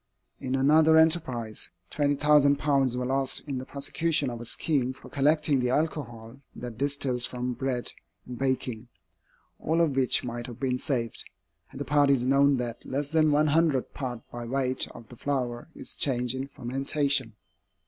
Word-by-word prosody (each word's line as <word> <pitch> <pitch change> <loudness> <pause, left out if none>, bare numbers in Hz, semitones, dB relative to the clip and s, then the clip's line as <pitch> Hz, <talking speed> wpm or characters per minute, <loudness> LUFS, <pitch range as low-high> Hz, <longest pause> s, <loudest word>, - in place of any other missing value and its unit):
In 130 +1 -2
another 155 +4 +5
enterprise, 155 -9 +1 0.2
£20,000 145 -2 +3
were 125 0 -2
lost 135 +2 0
in 135 -3 -3
the 130 - -8
prosecution 145 0 -1
of 120 -1 -7
a - - -7
scheme 130 0 0
for - - -14
collecting 150 0 +3
the 125 0 0
alcohol 125 -5 -2 0.2
that 120 -2 -8
distils 135 -3 0
from 125 0 -3
bread 125 0 -2 0.3
in 125 - -7
baking, 125 -2 -2 0.7
all 160 +2 0
of 160 -5 +2
which 130 -2 +2
might 120 0 -5
have 120 -3 -9
been 125 -2 -1
saved, 125 -5 0 0.4
had - - -11
the - - -3
parties 140 -3 +3
known 140 +1 +4
that 120 -2 -4
less 140 +1 -3
than 155 -1 +3
one 150 +1 +3
hundredth 155 -3 +2
part 125 -4 -5
by 120 0 -6
weight 130 +1 -1
of 115 -2 -13
the 120 - -11
flour 125 -2 -3
is - - -8
changed 125 -3 0
in 130 +1 -4
fermentation. 135 -1 -1
135 Hz, 160 wpm, -27 LUFS, 125-145 Hz, 0.7 s, another